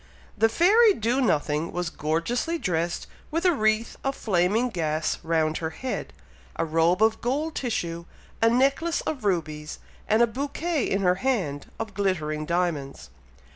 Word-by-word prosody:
The 225 +1 +3
fairy 410 - +5
Do 235 +5 0
nothing 155 - +1
was 175 -1 -3
gorgeously 170 - -1
dressed 170 - -1 0.2
with 330 +3 -2
a 360 - +5
wreath 215 -3 +1
of 270 0 -1
flaming 205 +5 +1
gas 155 -6 -1
round 160 -1 +1
her 160 - -3
head, 255 +11 -5 0.4
a - - -1
robe 165 +5 +2
of 220 0 +2
gold 295 +6 -1
tissue, 170 -11 -3 0.4
a 225 - +5
necklace 275 +7 +2
of 270 -8 -4
rubies, 155 -5 -2 0.3
and 220 +2 +4
a - - +7
bouquet 285 +5 -2
in 195 0 0
her 180 0 +4
hand, 185 - -1
of 220 -2 -4
glittering 155 -6 -1
diamonds. 165 - -2
200 Hz, 150 wpm, -26 LUFS, 165-255 Hz, 0.4 s, a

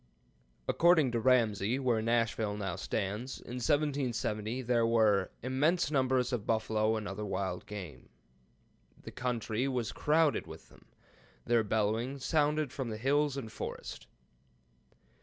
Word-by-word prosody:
According 165 -6 +4
to 120 - 0
Ramsey, 115 -2 +2
where 125 -5 +1
Nashville 115 -2 0
now 95 -4 -3
stands, 105 +6 -3
in 125 - -8
1770 130 -5 0
there 120 -1 +2
were 110 -4 +3
"immense 150 +6 +1
numbers 130 -2 +1
of 115 -4 -3
buffalo 110 0 +1
and 110 -2 -3
other 100 +2 -5
wild 95 -3 -3
game. 90 -11 -8 0.9
The - - -8
country 120 0 -2
was 125 -4 -1
crowded 155 0 +2
with - - -11
them. - - -20 0.6
Their 115 -1 +3
bellowings 110 +5 -1
sounded 150 -3 +1
from 130 -4 -3
the 110 - -4
hills 140 +3 +1
and 115 -5 -5
forest." - - -7
120 Hz, 130 wpm, -32 LUFS, 110-135 Hz, 0.9 s, According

